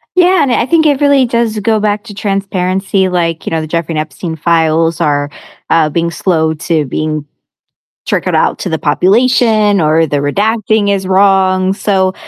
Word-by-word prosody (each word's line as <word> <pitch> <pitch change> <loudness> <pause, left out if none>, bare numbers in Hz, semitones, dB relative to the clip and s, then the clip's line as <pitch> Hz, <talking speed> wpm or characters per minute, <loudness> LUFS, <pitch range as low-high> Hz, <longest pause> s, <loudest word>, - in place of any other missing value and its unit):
Yeah, 365 -1 +4
and 260 - 0
I 235 - +1
think 315 +3 +2
it 285 -3 +2
really 285 -2 +3
does 235 -2 -1
go 220 +1 0
back 210 0 -1
to 210 - -10
transparency, 195 -1 -1
like, 170 -3 -2
you - - -2
know, 165 -1 -2
the 155 - -6
Jeffrey 165 0 -3
Epstein 160 +2 -5
files 165 0 +1
are, 145 -1 0 0.4
uh, 160 -2 +2
being 170 +2 -1
slow 160 -3 0
to 155 -1 -2
being 155 +2 -3 0.8
trickled - - -1
out - - +1
to - - -5
the 160 - -2
population, 215 +4 +2
or 160 +1 +2
the 145 - -1
redacting 210 +7 0
is 195 -1 -1
wrong. 190 0 +2
So, 190 -2 0
185 Hz, 170 wpm, -12 LUFS, 160-215 Hz, 0.8 s, Yeah